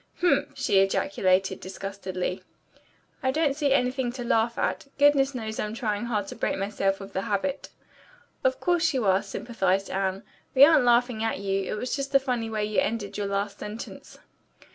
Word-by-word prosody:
"Humph!" 355 - +1
she 195 - +3
ejaculated 190 -1 +1
disgustedly. 190 -1 -5 0.8
"I 260 - +1
don't 290 0 +1
see 285 -2 0
anything 255 -1 +1
to 250 -1 -5
laugh 230 0 +1
at. - - -1
Goodness 280 -1 +4
knows 220 -2 -4
I'm 210 +1 -3
trying 215 -1 -2
hard 215 -4 -1
to - - -7
break - - -1
myself 195 0 -1
of 195 0 -10
the 190 - -1
habit." 210 +9 -2 0.7
"Of - - +1
course 345 -4 +1
you 245 -4 0
are," 190 0 +4
sympathized 195 -5 -1
Anne. 190 0 -1 0.3
"We 270 +2 +10
aren't 300 -4 +5
laughing 240 -2 +3
at 225 - 0
you. 195 0 -1
It - - -1
was 250 +4 -2
the 275 0 +4
funny 250 -4 -2
way 215 -1 -1
you 210 0 0
ended 210 -2 -2
your 205 -1 -2
last 200 0 -2
sentence." 210 +2 -8
220 Hz, 175 wpm, -26 LUFS, 195-260 Hz, 0.8 s, We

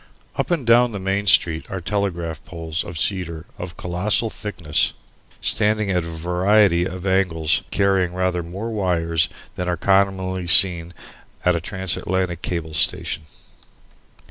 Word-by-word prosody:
Up - - -2
and 165 -8 -1
down 120 0 +4
the 100 - -4
Main 100 +2 -2
Street 80 -3 +3
are 95 - -4
telegraph 85 -4 -3
poles 80 -2 -4
of 85 - -8
cedar 85 -2 0
of 85 -1 -7
colossal 100 +6 0
thickness, 85 -8 -1 0.5
standing 105 -2 +1
at 90 -2 0
a - - -7
variety 90 +2 +2
of 95 0 -6
angles 90 -5 +1
and - - -22
carrying 95 -3 +1
rather 90 -1 0
more 95 +7 -6
wires 85 -5 0 0.3
than 90 - -3
are 90 - -1
commonly 95 -1 +1
seen 85 -1 +6 0.5
at 90 -1 +3
a 85 - -2
transatlantic 95 -2 -2
cable 85 -3 -4
station. 80 0 0
90 Hz, 145 wpm, -21 LUFS, 85-100 Hz, 0.5 s, seen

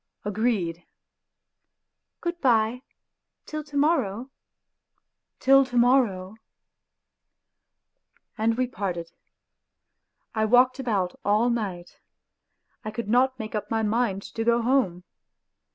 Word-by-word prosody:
" - - -40
Agreed." 205 -5 -1 0.7
" - - -58
Good 345 0 -4
bye 235 -1 +2 0.6
till 305 0 -5
to 290 -1 -7
morrow! 265 - +1 0.3
" - - -59
" - - -58
Till 275 +1 +6
to 245 -1 -4
morrow! 225 -6 +2 1.1
" - - -47
And 225 +1 +1
we 255 - +2
parted. 180 -8 -5 1.2
I 220 -1 +1
walked 250 +3 +4
about 200 -8 -1
all 215 +4 +2
night; 190 -7 -4 0.8
I 215 - -4
could 215 -1 -5
not 260 +3 +3
make 220 -2 -7
up 210 -1 -3
my 225 -1 0
mind 210 -2 0
to 225 - -2
go 235 0 +2
home. 225 -9 +1
230 Hz, 120 wpm, -25 LUFS, 205-255 Hz, 1.2 s, Till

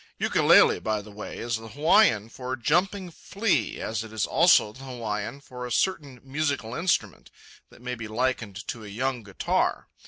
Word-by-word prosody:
Ukulele, - - +5
by 110 -1 -2
the 105 - -12
way, 105 +1 -8
is 115 -1 -2
the 115 0 -10
Hawaiian 125 - +3
for 125 +2 -5
"jumping 180 - 0
flea" 195 - -1
as 110 0 -3
it 110 - -11
is 110 -2 -1
also 165 -11 +4
the 130 - -12
Hawaiian 115 0 -4
for 125 -2 -9
a - - -9
certain 145 -6 -1
musical 140 -4 -2
instrument 170 +5 -1 0.4
that 120 - -18
may 125 0 -3
be 115 -2 -6
likened 115 -3 -2
to 115 - -5
a - - -9
young 125 +4 -2
guitar. 100 -3 -1
125 Hz, 175 wpm, -26 LUFS, 110-145 Hz, 0.4 s, Ukulele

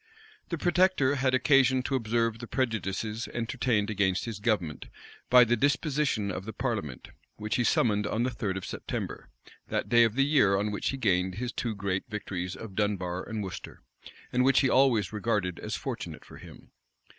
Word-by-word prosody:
The 170 - -2
protector 175 -5 +3
had 130 -2 +1
occasion 130 -1 +4
to 135 - -3
observe 115 -2 0
the 120 - -7
prejudices 110 -2 -2
entertained 115 -3 0
against 95 -3 +1
his 115 -4 -5
government, 100 - -1 0.4
by 125 0 +8
the 120 0 +2
disposition 140 - 0
of 95 +1 -5
the 110 - -6
parliament, 100 - -4 0.3
which 105 0 -2
he 120 - +2
summoned 105 -3 +2
on 115 - 0
the 130 - 0
third 100 -5 -3
of 95 - -6
September, - - -5 0.4
that - - -2
day 120 0 +6
of 115 -1 +1
the 135 +1 +3
year 130 -10 +4
on 105 +1 -1
which 105 - -2
he 135 - -3
gained 95 -6 +1
his 125 +3 -3
two 115 -4 -3
great 95 -2 -2
victories 95 -4 -4
of 110 -3 -9
Dunbar 95 -3 -2
and 110 -2 -3
Worcester, 95 - -8 0.5
and 125 0 +3
which 135 0 +4
he 135 - +2
always 120 -7 +3
regarded 105 -4 -1
as - - -4
fortunate - - -6
for - - -13
him. - - -14
110 Hz, 180 wpm, -28 LUFS, 100-130 Hz, 0.5 s, by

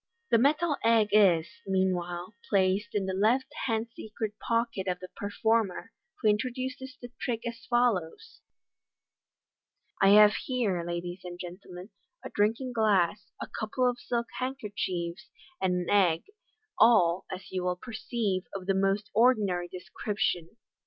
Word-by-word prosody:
The 230 - +5
metal 295 +4 +2
egg 225 -2 +4
is, 185 -6 +5 0.2
meanwhile, 180 -1 -1 0.2
placed 200 +3 +1
in 200 -2 +1
the 190 - -2
left 225 +7 +1
hand 225 -1 -1
secret 220 -1 -5
pocket 230 -4 -1
of 180 -1 -1
the 185 0 -9
performer, 220 0 0 0.3
who - - +4
introduces 255 +4 -2
the 245 -1 -10
trick 235 -3 -2
as 230 -1 -7
follows: 240 - 0 0.7
" - - -24
I 195 - +6
have 210 0 +7
here, 220 -9 -1
ladies 175 +1 -5
and 175 -1 -7
gentlemen, 180 +2 -9 0.3
a - - -6
drinking 230 +5 0
glass, 210 -3 +2
a - - -4
couple 250 +4 -1
of 245 0 -1
silk 235 -1 -2
handkerchiefs, 200 -9 -4 0.3
and 180 -1 +2
an - - -7
egg, 180 -5 +3 0.6
all, 185 -6 +5
as 185 - -8
you 185 -1 -2
will 180 0 0
perceive, 215 -2 -3
of 190 -2 -5
the 195 - +2
most 195 +2 0
ordinary 205 -6 +3
description." 180 0 -3
205 Hz, 140 wpm, -29 LUFS, 185-230 Hz, 0.7 s, have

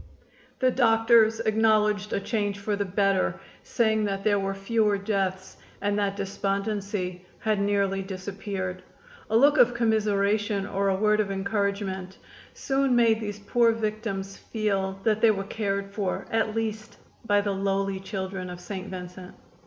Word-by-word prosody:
The 255 -1 +2
doctors 225 -2 +4
acknowledged 215 -2 +2
a - - 0
change 205 -1 -2
for 205 +1 -2
the 200 0 -1
better, 195 0 +1 0.2
saying 220 -2 +1
that 195 -1 -2
there 205 -1 +3
were 195 0 -2
fewer 210 +1 +1
deaths, 195 -2 -2 0.2
and 205 +1 0
that 200 -1 0
despondency 195 -2 -3
had 215 -2 0
nearly 200 -1 +1
disappeared. 190 -1 -5 0.5
A 220 - +3
look 285 +5 +5
of 245 0 +5
commiseration 210 -2 +1
or 200 0 0
a 190 - +2
word 210 +2 +2
of 210 -2 +1
encouragement 195 -1 -2 0.4
soon 270 -2 +1
made 230 -2 +4
these 205 -2 -5
poor 230 +3 +2
victims 215 -3 -3
feel 195 -3 -2
that 215 -1 +1
they 230 - +6
were 195 -2 +1
cared 200 -1 -3
for 200 -3 -2
at 225 -1 0
least 220 0 -3 0.3
by 205 0 +4
the 200 -1 -1
lowly 195 0 -1
children 190 -1 -5
of 180 0 -7
St. 185 +1 -6
Vincent. 180 0 -8
205 Hz, 150 wpm, -26 LUFS, 195-220 Hz, 0.5 s, they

